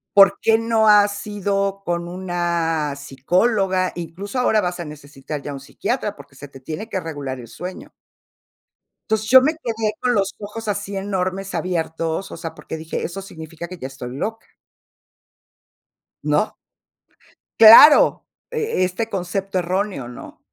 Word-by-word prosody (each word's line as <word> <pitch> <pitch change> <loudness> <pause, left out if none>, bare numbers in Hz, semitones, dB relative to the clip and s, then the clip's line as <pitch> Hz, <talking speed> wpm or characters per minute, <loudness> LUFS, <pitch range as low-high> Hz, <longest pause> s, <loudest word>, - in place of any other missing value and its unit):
¿Por 195 -1 +7
qué 225 0 +4
no 225 -1 +2
has 205 0 +4
ido 200 -1 -2
con 170 0 -2
una 170 -4 -1
psicóloga? 185 - 0
Incluso 185 +7 -5
ahora 220 -3 +3
vas 180 -3 -2
a - - -5
necesitar 145 -1 -8
ya 145 - -6
un 135 - -8
psiquiatra, 210 - -3
porque 140 -1 -15
se 145 +1 -11
te 135 - -13
tiene 160 - -7
que 190 - -2
regular 145 -6 -5
el 120 - -10
sueño. 180 +10 -8 1.2
Entonces, 220 0 0
yo 260 +1 +9
me 300 +5 +2
quedé 225 -8 -2
con 250 -1 +1
los 200 -3 0
ojos 215 +2 -7
así 205 -1 -3
enormes, 195 0 -3
abiertos, 165 0 -2
o - - -7
sea, 165 -1 -7
porque 160 - -7
dije, 160 0 -5
eso 195 +3 -5
significa 165 -2 -9
que 180 +1 -9
ya 130 - -6
estoy 130 -2 -8
loca 220 +10 -4 1.8
¿no? - - +1 1.1
Claro, 230 +7 +9 0.2
e 455 - -1
este 185 +5 -2
concepto 190 -1 -2
erróneo, 185 -6 -2
¿no? 120 - -11
185 Hz, 150 wpm, -21 LUFS, 160-210 Hz, 1.8 s, yo